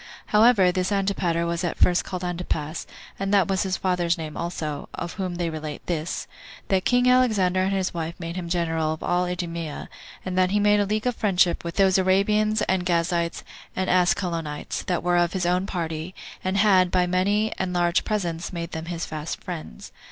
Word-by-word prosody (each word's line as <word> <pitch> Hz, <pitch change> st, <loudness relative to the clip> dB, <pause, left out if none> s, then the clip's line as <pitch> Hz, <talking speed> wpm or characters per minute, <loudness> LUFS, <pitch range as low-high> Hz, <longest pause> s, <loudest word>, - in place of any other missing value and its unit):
However, 210 Hz, -4 st, +5 dB
this 185 Hz, +2 st, -1 dB
Antipater 195 Hz, -4 st, 0 dB
was 170 Hz, +1 st, -2 dB
at 175 Hz, -, -2 dB
first 180 Hz, -1 st, +3 dB
called 185 Hz, -1 st, -5 dB
Antipas, 170 Hz, -3 st, -3 dB
2 -, -, -22 dB, 0.3 s
and 195 Hz, 0 st, -1 dB
that 195 Hz, -4 st, +4 dB
was 190 Hz, -1 st, 0 dB
his 190 Hz, -2 st, -1 dB
father's 180 Hz, -2 st, 0 dB
name 155 Hz, -2 st, -6 dB
also; 155 Hz, -4 st, -4 dB
of 170 Hz, -, -5 dB
whom 185 Hz, -2 st, -3 dB
they 170 Hz, -1 st, -2 dB
relate 155 Hz, -1 st, -6 dB
this: 165 Hz, -2 st, -3 dB, 0.4 s
That 190 Hz, -1 st, +2 dB
king 245 Hz, 0 st, +3 dB
Alexander 215 Hz, -8 st, +3 dB
and 190 Hz, +1 st, +1 dB
his 190 Hz, -1 st, -1 dB
wife 165 Hz, 0 st, -4 dB
made 165 Hz, 0 st, -5 dB
him 175 Hz, -2 st, -4 dB
general 165 Hz, -2 st, 0 dB
of 160 Hz, -, -8 dB
all 180 Hz, +1 st, +1 dB
Idumea, 170 Hz, -3 st, -4 dB, 0.4 s
and 185 Hz, -1 st, -3 dB
that 185 Hz, 0 st, +4 dB
he 205 Hz, +2 st, +2 dB
made 205 Hz, 0 st, +4 dB
a 205 Hz, -, +1 dB
league 215 Hz, +2 st, -1 dB
of 250 Hz, -1 st, +1 dB
friendship 180 Hz, -4 st, +2 dB
with 170 Hz, 0 st, -5 dB
those 190 Hz, -1 st, +4 dB
Arabians, 210 Hz, +3 st, +2 dB
and 185 Hz, -1 st, +1 dB
Gazites, 170 Hz, -1 st, 0 dB, 0.3 s
and 185 Hz, 0 st, 0 dB
Ascalonites, 175 Hz, -4 st, 0 dB
that 180 Hz, -3 st, 0 dB
were 175 Hz, 0 st, +2 dB
of 175 Hz, 0 st, +2 dB
his 185 Hz, -2 st, -1 dB
own 180 Hz, +2 st, +1 dB
party, 165 Hz, 0 st, -4 dB, 0.3 s
and 185 Hz, +1 st, 0 dB
had, 190 Hz, -3 st, +5 dB
by 180 Hz, 0 st, +2 dB
many 200 Hz, +4 st, +1 dB
and 185 Hz, -1 st, -1 dB
large 175 Hz, 0 st, +2 dB
presents, 175 Hz, -5 st, -2 dB
made 170 Hz, -1 st, -5 dB
them 160 Hz, -1 st, -5 dB
his 170 Hz, 0 st, -4 dB
fast 155 Hz, 0 st, -5 dB
friends. 160 Hz, -, -7 dB
180 Hz, 195 wpm, -24 LUFS, 170-190 Hz, 0.4 s, However